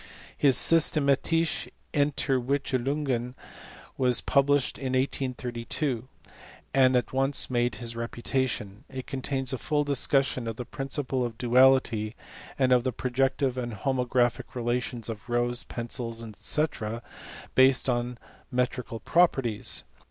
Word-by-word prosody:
His 135 -3 +4
Systematise?!* 160 +1 +3 0.3
Entivickelunyen 135 -2 0 0.6
was 125 -2 +5
published 140 -1 +2
in 130 -2 -3
1832, 130 -1 -2 0.7
and 130 -1 +5
at 125 - 0
once 135 0 0
made 120 -2 +1
his 115 +1 -5
reputation: 115 -3 -3
it 130 -1 -6
contains 135 -1 -3
a 130 - -3
full 150 -1 0
discussion 135 -3 +1
of 115 - -3
the 125 - -6
principle 135 -2 -3
of 115 -2 -4
duality, 125 -3 +3 0.4
and 130 -2 +2
of 125 -1 +5
the 130 - 0
projective 130 +1 0
and 120 -2 -4
homographic 125 +2 0
relations 120 -1 -2
of 115 +1 -7
rows, 120 0 0
pencils, 115 -1 -4
<fec., 115 - -2 0.5
based 130 +1 +5
on 120 -1 -1 0.3
metrical 125 -2 -2
properties. 135 -11 +2
125 Hz, 115 wpm, -27 LUFS, 120-135 Hz, 0.7 s, was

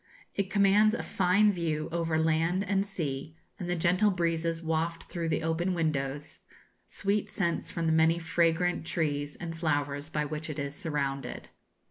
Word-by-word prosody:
It 200 -1 -1
commands 205 +2 +4
a - - -3
fine 200 +3 +3
view 160 -4 -1
over 165 -1 0
land 165 +4 +2
and 195 0 +1
sea, 155 -5 -4 0.2
and 175 - -4
the 180 - +1
gentle 180 +5 +3
breezes 165 -2 0
waft 165 +1 -1
through 170 -2 -4
the 160 - 0
open 170 +3 0
windows 145 -3 -2 0.5
sweet 200 +1 0
scents 190 -5 -1
from 170 - -2
the 160 - +3
many 160 +1 +4
fragrant 170 +1 +1
trees 145 -3 -1
and 165 -1 -6
flowers 145 -2 -1
by 150 -1 -1
which 155 +2 -4
it 155 - -5
is 140 0 -3
surrounded. 145 -5 -3
165 Hz, 160 wpm, -29 LUFS, 155-180 Hz, 0.5 s, commands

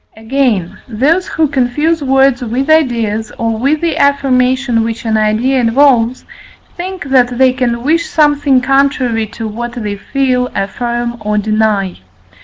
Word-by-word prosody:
Again, 220 -6 -1
those 285 +11 0
who 315 -1 0
confuse 290 +5 0
words 270 -1 +2
with 250 +5 -1
ideas, 230 -8 +1
or 225 -1 -2
with 285 +5 0
the 330 -2 -1
affirmation 260 -3 +1
which 230 +1 -5
an 220 -1 0
idea 220 +5 +1
involves, 245 0 +2 0.5
think 370 +2 -6
that 250 -3 +1
they 260 0 +4
can 240 -2 -2
wish 325 +5 +1
something 290 -3 +2
contrary 260 -4 +1
to 225 +1 -7
what 235 +3 -5
they 210 -4 -4
feel, 250 +3 -1
affirm, 240 +4 -3
or 210 0 -2
deny. 210 -3 0
250 Hz, 140 wpm, -13 LUFS, 225-275 Hz, 0.5 s, they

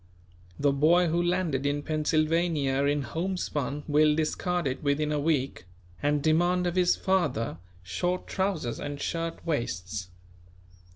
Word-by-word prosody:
The 145 0 +3
boy 165 +5 +4
who 170 +2 +1
landed 175 -6 0
in 145 +1 -1
Pennsylvania 155 -2 +1
in 145 0 +1
homespun 150 -1 -3
will 150 0 +4
discard 175 +2 -1
it 130 -1 -2
within 150 +1 0
a 150 - 0
week 140 - -1 0.4
and 145 0 +1
demand 175 +3 +3
of 175 0 -1
his 180 -1 +4
father 150 - 0 0.2
short 175 - -2
trousers 190 -10 -2
and 145 0 -5
shirt 165 +2 -3
waists. 100 - -3
150 Hz, 130 wpm, -28 LUFS, 140-175 Hz, 0.4 s, boy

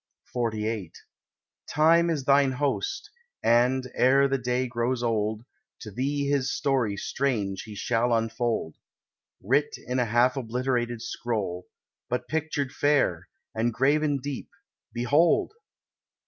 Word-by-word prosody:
XLVIII 110 -6 -2 0.8
"Time 165 +3 +4
is 155 -5 -1
thine 140 0 +4
host, 145 - -2 0.3
and, 125 +2 +3
ere 135 +2 +4
the 135 0 0
day 125 +1 0
grows 120 0 -1
old, 110 -1 -1 0.4
To 110 - -8
thee 140 +6 -1
his 140 -2 +1
story 125 -8 0
strange 105 -7 -1
he 105 - -8
shall 120 +3 0
unfold, 115 -6 -1 0.7
Writ 140 +8 +1
in 125 +1 -3
a 125 - +2
half 120 +3 +3
obliterated 120 -1 -2
scroll, 100 -9 -3 0.4
But 125 - -2
pictured 155 -4 -2
fair, 135 - +1 0.2
and 115 +2 0
graven 145 +4 +2
deep—behold!" 145 - -1
125 Hz, 115 wpm, -26 LUFS, 115-140 Hz, 0.8 s, Time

